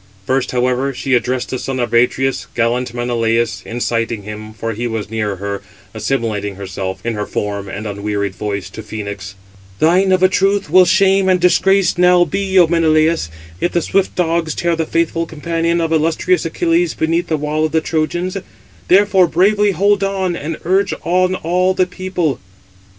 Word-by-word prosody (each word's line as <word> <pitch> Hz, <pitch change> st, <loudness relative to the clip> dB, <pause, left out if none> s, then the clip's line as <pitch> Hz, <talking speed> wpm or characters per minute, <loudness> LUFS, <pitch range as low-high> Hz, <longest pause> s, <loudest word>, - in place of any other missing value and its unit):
First, 130 Hz, +2 st, 0 dB
however, 125 Hz, +2 st, 0 dB
she 135 Hz, -, -2 dB
addressed 125 Hz, +1 st, 0 dB
the 130 Hz, -, -2 dB
son 135 Hz, -1 st, -4 dB
of 120 Hz, -2 st, -2 dB
Atreus, 125 Hz, +3 st, +1 dB
gallant 120 Hz, +2 st, 0 dB
Menelaus, 120 Hz, -1 st, -1 dB
inciting 115 Hz, -2 st, -2 dB
him, 105 Hz, +1 st, -8 dB
for 115 Hz, +1 st, -4 dB
he 120 Hz, +3 st, -3 dB
was 110 Hz, -2 st, -4 dB
near 105 Hz, -3 st, -2 dB
her, 100 Hz, +1 st, -5 dB, 0.3 s
assimilating 105 Hz, -6 st, -2 dB
herself, 95 Hz, 0 st, -6 dB
in 120 Hz, -, -1 dB
her 105 Hz, -1 st, -4 dB
form 100 Hz, -1 st, -3 dB
and 100 Hz, +3 st, -6 dB
unwearied 100 Hz, -1 st, -3 dB
voice, 100 Hz, -1 st, -4 dB
to 110 Hz, -, -8 dB
Phœnix: 100 Hz, -2 st, -7 dB, 0.4 s
"Thine, 180 Hz, -, +3 dB
of 185 Hz, 0 st, +3 dB
a -, -, +8 dB
truth, 195 Hz, +1 st, +1 dB
will 185 Hz, 0 st, +7 dB
shame 190 Hz, +1 st, +3 dB
and 185 Hz, -1 st, +3 dB
disgrace 190 Hz, +1 st, +3 dB
now 180 Hz, 0 st, +5 dB
be, 190 Hz, +3 st, -1 dB
O 180 Hz, -, +8 dB
Menelaus, 160 Hz, -, +2 dB, 0.3 s
if 175 Hz, -, -1 dB
the 175 Hz, -, +2 dB
swift 195 Hz, -1 st, 0 dB
dogs 165 Hz, -2 st, 0 dB
tear 170 Hz, -1 st, 0 dB
the 160 Hz, -1 st, -2 dB
faithful 165 Hz, 0 st, 0 dB
companion 165 Hz, +2 st, -1 dB
of 165 Hz, -1 st, -1 dB
illustrious 165 Hz, -, +1 dB
Achilles 345 Hz, 0 st, 0 dB
beneath 165 Hz, +2 st, 0 dB
the 160 Hz, -, 0 dB
wall 150 Hz, +1 st, -1 dB
of 155 Hz, -, -2 dB
the 160 Hz, -, +2 dB
Trojans; 170 Hz, +4 st, -2 dB, 0.5 s
therefore 190 Hz, -1 st, +4 dB
bravely 205 Hz, +5 st, +3 dB
hold 200 Hz, +1 st, +2 dB
on, 190 Hz, -2 st, -1 dB
and 160 Hz, 0 st, -5 dB
urge 190 Hz, +3 st, +1 dB
on 185 Hz, +1 st, +1 dB
all 180 Hz, +2 st, 0 dB
the 185 Hz, -1 st, +3 dB
people." 180 Hz, -4 st, -2 dB
160 Hz, 170 wpm, -17 LUFS, 115-185 Hz, 0.5 s, a